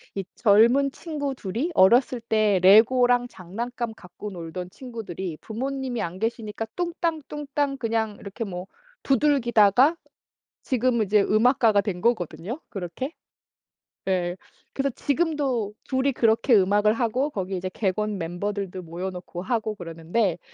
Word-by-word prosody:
이 195 - -2
젊은 240 +6 +4
친구 285 -5 -4
2 190 -5 -7
이 315 +9 0
어렸을 240 +6 +5
때 215 -4 +2
레고랑 245 +5 +6
장난감 235 +5 -5
갖고 200 +2 -9
놀던 180 +1 -7
친구들이 195 - -6
부모님이 260 +1 -4
안 170 +2 -4
계시니까 225 -1 -3
뚱땅 340 -2 -1
뚱땅 285 -1 -2
그냥 225 -3 -1
이렇게 200 +3 -6
뭐 180 -3 -6 0.4
두들기다가 260 - +4 0.7
지금은 245 -4 +1
이제 210 +1 +4
음악가가 220 0 +4
된 195 -3 -4
거거든요, 230 - -1
그렇게. 195 - -5 0.9
네. 180 -2 0 0.4
그래서 275 0 0
지금도 280 -8 0
2 260 0 0
이 280 - +4
그렇게 230 +2 +3
음악을 205 +2 +4
하고 245 +5 0
거기 190 -7 -4
이제 185 +1 -3
객원 210 +1 -1
멤버들도 190 +2 -4
모여놓고 180 +1 -6
하고 220 -1 -1
그러는데 170 +2 -2
220 Hz, 295 characters per minute, -25 LUFS, 190-255 Hz, 0.9 s, 레고랑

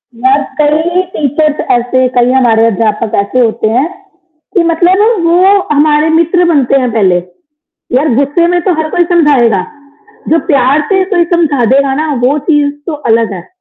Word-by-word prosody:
यार 260 +4 +1 0.2
कई 320 +4 +1
टीचर्स 300 +1 -1
ऐसे 245 +2 +1
कई 245 0 +2
हमारे 235 -4 +2
अध्यापक 215 0 -1
ऐसे 200 +6 -3
होते 225 -2 0
हैं 255 +7 0 0.7
कि 360 - +3
मतलब 370 +5 +1
वो 355 +3 +3 0.2
हमारे 300 +1 +2
मित्र 335 +2 +1
बनते 275 -2 +1
है 250 - -1
पहले, 195 -5 +1 0.8
यार 275 0 +1
गुस्से 285 +6 +1
में 350 - 0
तो 370 - +1
हर 310 - -4
कोई 350 - +1
समझाएगा, 260 - +2 0.7
जो 325 +2 +2
प्यार 280 -2 +2
से 380 -1 +2
कोई 345 -1 +1
समझा 295 -7 0
देगा 275 0 +1
ना, 305 +1 -2
वो 255 +3 0
चीज़ 295 -2 +2
तो 335 - -4
अलग 230 -7 -1
है। 175 -2 -9
285 Hz, 165 wpm, -10 LUFS, 245-325 Hz, 0.8 s, कि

